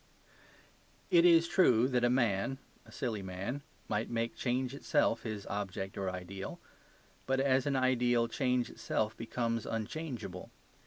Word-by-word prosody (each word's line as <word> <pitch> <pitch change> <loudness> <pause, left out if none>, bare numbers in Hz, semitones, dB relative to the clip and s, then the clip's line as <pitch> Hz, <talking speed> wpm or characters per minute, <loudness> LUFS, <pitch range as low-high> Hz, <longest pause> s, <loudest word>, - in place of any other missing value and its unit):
It 170 0 +6
is 170 -1 +6
true 125 -11 +4
that 125 -2 +1
a 120 - +4
man 120 0 +1 0.3
(a - - -14
silly 110 -4 -3
man) 95 +9 -4 0.3
might 105 +2 -1
make 115 0 -1
change 125 +1 -1
itself 140 -4 +1
his 110 -3 -5
object 95 -1 -4
or 95 -1 -2
ideal. 90 +1 -6 0.7
But 135 0 +2
as 135 0 +2
an 140 - +1
ideal, 125 -2 +3
change 125 0 0
itself 110 0 -1
becomes 115 0 -2
unchangeable. 115 - -4
120 Hz, 140 wpm, -33 LUFS, 105-130 Hz, 0.7 s, It